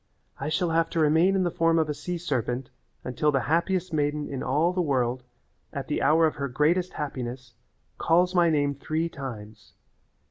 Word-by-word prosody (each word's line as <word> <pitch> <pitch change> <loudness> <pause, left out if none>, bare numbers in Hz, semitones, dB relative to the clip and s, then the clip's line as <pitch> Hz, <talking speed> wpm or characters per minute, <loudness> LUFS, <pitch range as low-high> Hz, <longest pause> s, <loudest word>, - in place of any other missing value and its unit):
I - - -3
shall 165 +2 0
have 165 0 +2
to 165 - -2
remain 160 +5 +4
in 190 - +2
the 175 - 0
form 165 -1 +2
of 160 -1 +2
a 150 - -1
sea 175 +4 -4
serpent 130 -5 -2 0.3
until 150 +4 0
the 135 -2 +1
happiest 170 +4 0
maiden 145 0 0
in 135 - -5
all 160 +7 +1
the 180 - 0
world, 130 -5 0 0.5
at - - -5
the - - -1
hour 160 +3 +4
of 155 - -1
her 140 -1 -2
greatest 165 +8 +1
happiness, 125 -3 -5 0.5
calls 180 +2 +3
my 175 -2 +4
name 145 -2 +1
three 155 +4 -2
times. 110 -7 -9
150 Hz, 185 wpm, -26 LUFS, 135-170 Hz, 0.5 s, remain